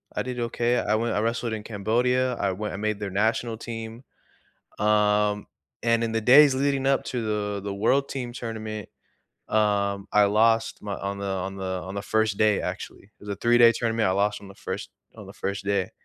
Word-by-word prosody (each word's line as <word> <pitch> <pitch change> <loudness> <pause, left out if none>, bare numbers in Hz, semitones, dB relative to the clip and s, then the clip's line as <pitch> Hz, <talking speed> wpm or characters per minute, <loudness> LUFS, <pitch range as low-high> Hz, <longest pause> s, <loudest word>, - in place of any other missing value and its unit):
I - - -1
did 125 -1 -5
okay. 120 +1 0
I 105 - +1
went 115 +1 0
I - - +1
wrestled 115 +1 -1
in 110 - -4
Cambodia, 120 +5 +1
I 100 -4 0
went 105 +3 -4
and 95 - -6
made 110 -1 -1
their 100 -2 -4
national 110 +3 0
team. 115 +1 -7 0.8
Um, 105 -1 +2 0.4
and 115 0 +2
in 115 - -1
the 115 - 0
days 135 +5 +7
leading 135 0 0
up 135 -1 +2
to 125 - -3
the 105 -1 -2
the 100 -1 -3
world 130 +8 +1
team 125 -3 -5
tournament, 110 -3 -6 0.6
um, 100 -2 +1
I 105 -1 +6
lost 115 +2 +2
my 100 -1 -4
on 100 0 -4
the 100 - -3
on 95 0 -3
the 95 - -5 0.2
on 95 +2 -7
the 100 - -2
1st 110 -1 +1
day, 105 -2 +3
actually - - -6
it 100 - -31
was 105 - -10
a 100 - -2
three-day 120 0 +6
tournament, 115 -2 0
I - - +2
lost 100 +2 0
on 100 - -11
the 100 - -13
1st 95 0 -6 0.3
on - - -10
the - - -11
1st 100 0 -4
day. 100 -2 0
110 Hz, 210 wpm, -25 LUFS, 100-115 Hz, 0.8 s, days